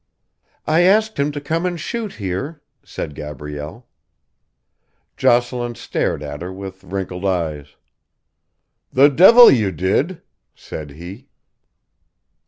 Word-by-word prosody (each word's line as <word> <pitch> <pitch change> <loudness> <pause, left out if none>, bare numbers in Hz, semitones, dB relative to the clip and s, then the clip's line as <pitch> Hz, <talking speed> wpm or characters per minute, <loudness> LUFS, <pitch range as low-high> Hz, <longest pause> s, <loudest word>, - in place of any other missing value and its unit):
"I 160 +2 +3
asked 215 +3 +3
him 140 +1 +1
to 145 - -5
come 160 +4 -2
and 175 -2 -2
shoot 225 +5 -4
here," 105 - -5 0.2
said 75 - -6
Gabrielle. 75 - -8 1.3
Jocelyn 120 0 +1
stared 75 - -2
at 75 +1 -7
her 90 +1 -5
with 95 0 -9
wrinkled 95 -1 -5
eyes. 80 -6 -2 1.2
"The 140 +3 +6
devil 225 - +8
you 105 -6 +2
did!" 100 - -1 0.3
said 75 -2 -8
he. 90 - -11
100 Hz, 110 wpm, -19 LUFS, -, 1.3 s, devil